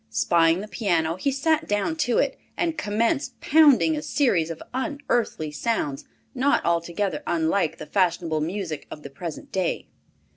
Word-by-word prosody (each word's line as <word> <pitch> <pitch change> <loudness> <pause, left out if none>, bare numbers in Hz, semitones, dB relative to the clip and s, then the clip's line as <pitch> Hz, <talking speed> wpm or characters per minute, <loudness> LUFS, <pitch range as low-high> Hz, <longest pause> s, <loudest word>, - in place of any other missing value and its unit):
Spying 165 - +3
the 210 - -7
piano, 170 -5 0
he 275 +10 -1
sat 315 +4 +1
down 205 +10 0
to 245 -6 +1
it, - - +1 0.2
and 330 -2 0
commenced 230 0 -1
producing 315 0 +5
a 300 - -3
series 240 - +1
of 165 - -6
unearthly 255 - -1
sounds, 150 - -2 0.3
not 275 +3 +1
altogether 170 +3 -1
unlike 165 +1 +1
the - - -8
fashionable 170 -2 0
music 170 -1 -4
of 150 - -9
the 140 - -9
present 165 +2 -7
day. 185 -3 -1
195 Hz, 150 wpm, -24 LUFS, 165-270 Hz, 0.3 s, producing